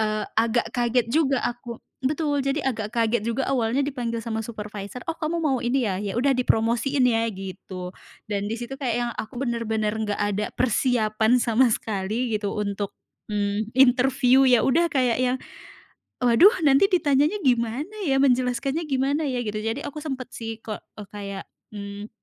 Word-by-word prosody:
eee, 215 0 0
agak 230 +1 +1
kaget 240 -1 +1
juga 275 -4 +2
aku 240 -1 -4 0.3
betul, 295 0 0
jadi 275 +2 0
agak 220 -4 -2
kaget 230 -2 +1
juga 235 +4 -1
awalnya 245 0 +1
dipanggil 240 -5 -3
sama 225 0 -3
supervisor, 210 0 -7
"Oh, 330 - -5
kamu 330 +1 -2
mau 275 -5 +1
ini 250 +1 +1
ya? 190 - -1
Ya 205 -2 -3
udah 270 +3 +3
dipromosiin 245 +3 +1
ya" 225 -1 +2
gitu. 185 -1 -7 0.4
Dan 205 -1 -2
di 225 - -2
situ 240 +3 -6
kayak 245 -4 0
yang 240 0 -1
aku 240 +3 -6
benar-benar 225 -4 -1
nggak 210 -2 -2
ada 205 0 0
persiapan 235 -1 +2
sama 235 +2 +3
sekali 215 +3 -1
gitu 205 -1 -3
untuk, 200 -1 -2 0.4
mmm, 205 +2 -1
interview. 260 0 +5
Ya 250 -3 +5
udah, 330 +6 +3
kayak 250 -4 +2
yang, 255 0 +1 0.8
"Waduh 250 - +6
nanti 280 +8 +5
ditanyanya 300 +2 +2
gimana 250 - 0
ya? 270 - +3
Menjelaskannya 260 +3 +1
gimana 275 +3 +1
ya?" 245 -2 -2
Gitu. 215 0 -3
Jadi 225 +5 -2
aku 300 +1 -6
sempet 265 -5 -4
sih 225 -1 -5
kek 215 -2 -6 0.2
eee, 210 -2 -8
kayak, 200 -1 -6 0.3
mmm, 205 0 -7
240 Hz, 165 wpm, -24 LUFS, 215-265 Hz, 0.8 s, Waduh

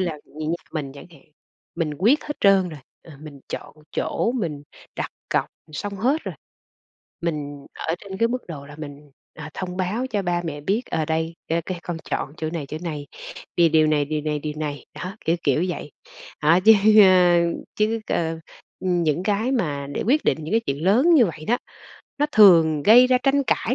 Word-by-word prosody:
là 170 -5 -2
như 155 +1 -7
nhà 165 - +1 0.2
mình 140 -4 -4
chẳng 140 - -11
hạn, 145 -5 -18 0.5
mình 160 -3 -2
quyết 240 +11 +3
hết 295 - -5
trơn 195 -2 +4
rồi, 155 -4 -9 0.2
ờ, 160 - -14
mình 150 -3 -11
chọn - - -7 0.2
chỗ 235 - 0
mình 160 - -3 0.3
đặt - - -3 0.2
cọc - - +1 0.3
xong 200 +7 -4
hết 265 +10 +1
rồi. - - -5 0.9
Mình 145 -4 -4 0.2
ở 165 - +2
trên 190 -1 -8
cái 230 +2 +3
mức 250 +1 -4
độ 145 -4 -8
là 145 +1 -12
mình, 145 -1 -10 0.2
à, 155 0 -8
thông 180 -1 -5
báo 205 +7 -1
cho 210 -5 -2
ba 175 -1 -1
mẹ 145 -3 -5
biết, 200 +10 0
ờ, 160 - 0
đây 160 +1 -2
cái 165 +1 0
cái 180 +1 -5
con 175 -2 -4
chọn 140 - -2
chỗ 155 0 -3
này, 160 -5 -4
chỗ 150 +3 -6
này, 150 -4 -5 0.5
vì 170 -1 +5
điều 155 0 +4
này, 150 -1 +2
điều 155 +1 -2
này, 150 0 -1
điều 150 0 -4
này, 150 -2 -5
đó, 185 +3 -6
kiểu 165 - +3
kiểu 145 +4 +2
vậy. 170 -4 -5 0.5
Đó 160 +4 +5
chứ, 220 - +11 0.3
ơ, 180 -2 +6 0.4
chứ, 220 +2 +1
ơ, 165 -1 -1 0.4
ừm, 180 -2 0
những 160 +2 0
cái 210 +6 0
mà 145 - -1
để - - -1
quyết 295 +5 +2
định - - +2
những 160 - -5
cái 225 - +4
chuyện 140 +4 -2
lớn 255 - +5
như 255 -8 +6
vậy 160 -3 -7
đó, 245 - +2 0.6
nó 295 - +2
thường 165 -8 +6
gây 240 - +7
ra 255 0 +3
tranh 275 +2 +2
cãi 250 - 0
170 Hz, 205 wpm, -23 LUFS, 150-205 Hz, 0.9 s, chứ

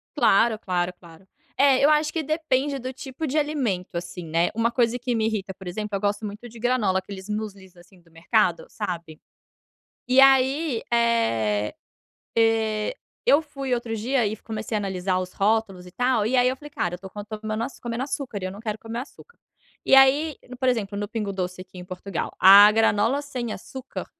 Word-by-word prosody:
Claro, 225 -3 +3
claro, 180 -2 -1
claro. 170 +1 -17 0.3
É, 275 -1 +4
eu 290 - +6
acho 305 0 +2
que 325 - -1
depende 290 -2 0
do 255 +1 -5
tipo 265 +4 -6
de 295 +3 -1
alimento, 255 - -1
assim, 175 0 -5
né. 165 +2 +1
Uma 230 +1 +1
coisa 240 -1 +1
que 245 -1 -2
me 220 - +1
irrita, 205 -3 -2
por 190 0 -12
exemplo, 210 +3 -4
eu - - -1
gosto 205 +1 -1
muito 210 +3 -7
de 230 0 -13
granola, 225 -6 +1
aqueles 190 0 -9
muslis 200 -3 -6
assim 180 +2 -19
do 165 - -26
mercado, 175 +2 +1
sabe? 170 -6 -6 0.9
E 255 +1 +4
aí, 270 0 +4
eh 115 - +1 0.6
eh, 225 - +2 0.3
eu 290 - +5
fui 275 -4 -4
outro 235 -2 -2
dia 240 +3 0
e 210 +1 -2
comecei 220 0 -5
a 210 - +1
analisar 185 -1 -1
os 185 0 -6
rótulos 200 -3 0
e 180 - -12
tal, 245 -1 +1
e 255 +4 +1
aí 245 - +4
eu 255 - 0
falei: 295 +2 -12
"Cara, 175 -11 -2
eu - - -1
estou 190 +1 -10
co 205 +1 -7 0.2
comendo 215 +1 -3 0.8
e - - -2
eu 185 - -3
não 200 - -10
quero 215 -2 -3
comer 230 +1 -5
açúcar." 320 - -12 0.5
E 270 - +6
aí 280 +3 +5
no, 250 - -8
por 260 0 +2
exemplo, 205 -5 -2
no 205 0 -3
Pingo 215 -2 -3
Doce 185 -1 -4
aqui 185 0 -13
em 180 - -8
Portugal, 185 -1 -5
a 200 +3 +9
granola 225 +5 +2
sem 250 -6 -5
açúcar 265 +6 -7
220 Hz, 195 wpm, -24 LUFS, 190-255 Hz, 0.9 s, a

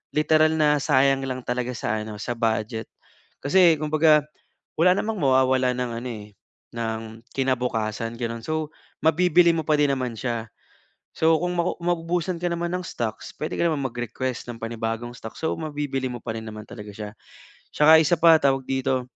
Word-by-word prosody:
literal 155 +1 +4
na 150 -1 +3
sayang 135 0 +3
lang 130 -1 -4
talaga 125 0 -1
sa 110 -1 -2
ano, 110 0 -7
sa 120 - -3
budget. 110 -1 -1 0.6
Kasi 170 +3 +5
kumbaga, 155 0 +4 0.6
wala 180 +2 +6
namang 220 0 -2
mawawalan 130 -2 +3
ng 125 -1 -2
ano 125 - -5
eh, 105 -3 -7 0.5
ng 110 -1 -2 0.3
kinabukasan, 120 -4 -1
ganoon. 115 -1 -4
So 155 -1 -2 0.3
mabibili 170 +2 +4
mo 160 - -1
pa 155 - +3
din 145 -1 +3
naman 125 -3 -2
siya. 115 -3 -3 0.6
So, 160 0 +3
kung 180 0 -1
maku 170 +1 0
maubusan 175 +1 -1
ka 175 - 0
naman 170 +1 -2
ng 180 - -1
stocks, 110 -2 -5
pwede 155 - -4
ka - - +1
naman 150 -3 -1
mag-request 120 +1 -4
ng 120 - -6
panibagong 115 +1 -4
stocks, 110 -2 -10
so - - +1
mabibili 145 -4 -3
mo 125 - -5
pa 110 - -3
rin - - -5
naman 110 -1 -8
talaga 105 -3 -9
siya. 105 0 -7 0.6
Tsaka 160 +2 +7
isa, 160 +2 +2
pa 165 0 +7
tawag 135 -1 +2
dito, 130 -1 -1
130 Hz, 170 wpm, -24 LUFS, 115-160 Hz, 0.6 s, Tsaka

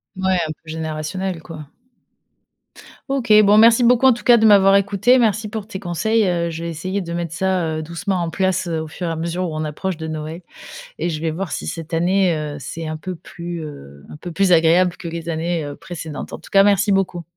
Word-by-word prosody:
Ouais, 190 0 0
un - - -4
peu 155 - -14
générationnel, 160 +3 -4
quoi. 155 -3 -10 1.4
OK, 245 -5 +1
bon, 205 +1 +5
merci 230 +2 +6
beaucoup 245 +2 +4
en 260 - +7
tout 235 - -9
cas 240 -1 +6
de 220 - +3
m'avoir 195 -2 +6
écoutée. 200 +5 +3
Merci 215 -2 +1
pour 215 -1 -5
tes 190 -4 -6
conseils, 200 +4 0
heu, 170 -1 0
je 165 +1 -6
vais 170 - -3
essayer 185 +5 -3
de 170 -2 -7
mettre 170 -1 -3
ça, 185 -1 0
heu, 155 - -3
doucement 175 +4 -3
en 170 - -2
place, 185 +1 0
heu, 160 -2 -2
au 160 - -6
fur 170 +3 -6
et - - -1
à 165 - -2
mesure 170 +2 -3
où 155 - -6
on 155 - -2
approche 155 +4 -4
de 160 - -6
Noël 155 +2 -6 0.6
et - - -1
je 155 -2 -3
vais 165 -1 -1
voir 175 +2 -5
si - - -4
cette 165 0 -6
année, 180 +1 +2
heu, 150 -1 -4
c'est 160 +5 -6
un 155 - -4
peu 185 +4 -6
plus, 170 0 -8
heu, 70 - -11
un - - -9
peu 175 +3 -8
plus 195 +3 +2
agréable 175 +1 +4
que 175 - -9
les 165 0 -6
années, 165 0 -1
heu, 145 0 -7
précédentes. 165 -4 -7
En - - -6
tout - - -16
cas, 195 0 +6
merci 205 0 +3
beaucoup. 190 -3 0
175 Hz, 235 wpm, -20 LUFS, 160-195 Hz, 1.4 s, en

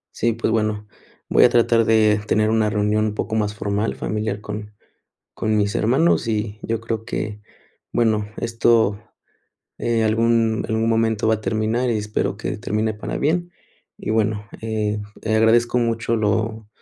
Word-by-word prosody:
Sí, 115 0 +1
pues 115 - -1
bueno, 105 -1 -1 0.4
voy - - +5
a 125 - +7
tratar 115 -1 +3
de 110 -1 +3
tener 110 0 +2
una 110 -1 +2
reunión 105 +1 +1
un 105 -1 -2
poco 110 - -3
más 105 -1 0
formal, 105 +1 -1
familiar 105 -1 -3
con 105 0 -6 0.6
con 110 0 0
mis 100 0 0
hermanos, 130 +7 +2
y 105 -1 -2
yo 115 0 -2
creo 115 -1 -4
que, 105 -2 -4 0.5
bueno, 110 -3 +1
esto, 115 -2 +2 0.8
eh, 115 -1 0
algún 115 0 +2
algún 110 +1 0
momento 115 -1 +1
va 110 - +4
a - - -11
terminar 110 +3 0
y 115 - +1
espero 105 -2 -2
que 110 - -4
termine 110 +1 -1
para 105 - -5
bien, 175 +4 0 0.5
y - - -5
bueno, 110 -1 0
eh 105 -1 -2 0.2
eh, 110 0 0
agradezco 115 +2 +3
mucho 115 -1 0
lo, 110 0 -1
110 Hz, 160 wpm, -21 LUFS, 105-115 Hz, 0.8 s, a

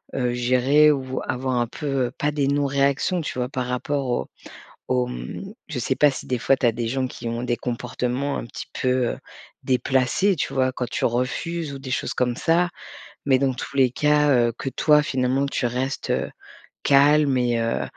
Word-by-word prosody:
heu, 125 -2 0
gérer 130 +5 +4
ou 140 -3 -1
v 130 0 -6
avoir 130 0 -1
un 120 - 0
peu, 150 - -8 0.2
heu, - - -8
pas 150 - 0
des 145 -2 0
non-réactions, 140 +4 +1
tu 150 - -5
vois, 125 0 -1
par 130 -2 -3
rapport 135 +2 -2
au 120 - 0 0.6
au, 125 -1 +1
mmh, 195 +10 -7
je 150 -6 -4
sais 130 +2 0
pas, 145 +1 +5
si - - -7
des 125 - 0
fois 135 - +3
tu 130 - -2
as - - +4
des 115 0 -3
gens 130 +2 -1
qui 120 -1 -8
ont 115 +1 -3
des 120 -1 -1
comportements 125 +3 -2
un - - -5
petit 115 - -8
peu, 130 - +1 0.2
heu, - - -8 0.5
déplacés, 130 +9 +2
tu 155 - -3
vois, 130 -1 +2
quand 125 -1 -4
tu - - -3
refuses 140 +6 -2
ou 135 - -7
des 135 -1 -8
choses 125 - -1
comme 125 -1 0
ça. 170 +6 +2 0.6
Mais 135 -2 +4
dans 135 -1 +1
tous 130 - -7
les 130 -2 +5
cas, 150 +1 +3
heu, 120 -3 +3
que - - -6
toi, 150 +3 +4
finalement, 130 0 0
tu 140 -2 -2
restes, 130 +3 -2
heu, - - 0 0.6
calme 145 0 +5
et 120 -1 +1
heu, 115 0 -1
130 Hz, 205 wpm, -23 LUFS, 125-145 Hz, 0.6 s, pas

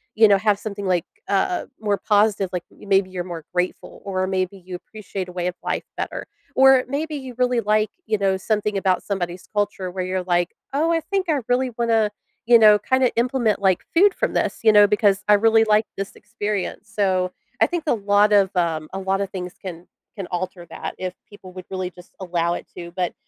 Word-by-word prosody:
you 220 - +6
know, 200 -1 +5
have 210 0 +2
something 205 -2 -5
like, 180 -2 +1 0.2
uh, 200 - 0
more 205 -2 0
positive, 205 -3 +2
like, 180 -1 -2
maybe 195 -1 +1
you're 180 -1 -4
more 165 -2 -8
grateful 180 0 -3
or 185 -1 -1
maybe 185 0 -1
you 185 -1 -9
appreciate 195 -1 -7
a - - -8
way 180 0 -2
of 180 - -3
life - - -2
better, - - -4 0.3
or 265 -1 +6
maybe 300 +3 -3
you 260 -2 -8
really 250 -1 +2
like, 215 0 +2 0.2
you 215 - 0
know, 195 -1 +1
something 210 +1 -1
about 190 -2 +1
somebody's 180 -2 -4
culture 205 -3 -1
where 185 0 -3
you're 185 0 -2
like, 175 -1 0 0.2
"Oh, 320 +4 +2
I 330 - +1
think 385 +3 -2
I 290 -3 +2
really 250 +1 +1
wanna, 225 -3 +2 0.3
you 235 0 +7
know, 210 -1 +7
kinda 260 +2 +2
implement, 235 -4 +1
like, 190 -2 +2
food 390 +4 +6
from - - -1
this, - - -1
you 220 - +7
know, 205 -1 +7
because 205 -1 +2
I 210 - +6
really 225 +1 +4
like 215 0 +3
this 195 0 -5
experience." 205 -2 -4
So 185 -3 0 0.3
I - - +6
think 345 -2 -3
a - - +4
lot 205 0 +3
of, 195 -2 +5
um, 160 -3 0
a 195 - -3
lotta 195 +1 -1
things 180 -2 -6
can 175 -2 -8 0.3
can 195 -4 -6
alter 180 0 -4
that - - -6
if 185 -1 -4 0.2
people 190 -3 -13
would 185 -1 -9
really 185 -1 -3
just 180 0 -16
allow 170 -2 -1
it - - -8
to, 170 -1 -8
but 180 0 -2
200 Hz, 210 wpm, -22 LUFS, 185-220 Hz, 0.3 s, you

